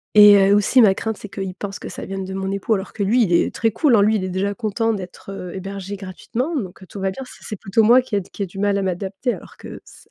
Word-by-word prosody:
et 205 -1 +9
heu, 205 - +6
aussi 225 +5 +4
ma 195 -3 +5
crainte, 220 -2 -3
c'est 210 - -9
qu'ils 195 -1 -5
pensent 195 +1 -6
que - - -8
ça - - -7
vienne 195 0 -5
de 190 - -6
mon 190 0 -3
époux, 200 +3 0
alors 195 -1 -3
que 205 - -2
lui, 230 +5 +3
il 175 - -1
est 170 - +2
très 225 - +1
cool, 275 -3 +3
hein. 205 - +5
Lui, 215 +2 +3
il 195 - -1
est 185 - -3
déjà 195 +2 -1
content 225 0 -1
d'être, 190 0 -8
heu, 180 -2 -7
hébergé 195 +1 -6
gratuitement, 225 - -4
donc, 195 -7 -5
heu, 190 - -13
tout 200 - -9
va 190 0 0
bien, 265 - -8
c'est - - -14
c'est 215 - -4
plutôt 200 +3 +2
moi 240 +4 +6
qui 245 -4 -5
ai 200 - +1
qui 200 - -11
ai 200 - +1
du 195 - -13
mal 205 0 +1
à - - -1
m'adapter 190 +6 -2
alors - - -14
que - - -9
s - - -17
200 Hz, 305 wpm, -21 LUFS, 190-220 Hz, -, et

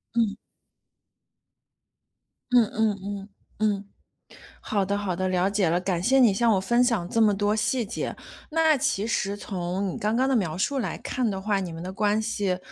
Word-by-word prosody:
嗯。 220 -3 +1 2.2
嗯 245 -1 +6
嗯 215 -2 +1
嗯， 200 0 -6 0.3
嗯。 205 -2 0 0.8
好 205 -2 0
的 200 +1 -1
好 200 -3 -2
的， 185 +1 -1
了 185 +1 +2
解 200 -4 +1
了， 170 +2 +2
感 180 -2 -1
谢 265 +5 +4
你 235 -6 +6
向 230 +3 +3
我 195 - +2
分 240 +5 +3
享 230 -8 +1
这 230 - +1
么 215 -2 +5
多 205 +1 +1
细 230 +3 0
节。 - - -4 0.4
那 320 -1 +4
其 255 -7 0
实 205 -3 -1
从 185 0 -3
你 - - -5
刚 215 +2 0
刚 260 - +2
的 270 - +2
描 175 -8 0
述 275 +8 0
来 240 - -3
看 250 -4 -1
的 195 -2 -3
话， 205 0 0
你 180 - -5
们 165 - -7
的 185 +1 -6
关 210 +1 +1
系 205 -4 -1
205 Hz, 205 characters per minute, -26 LUFS, 190-230 Hz, 2.2 s, 嗯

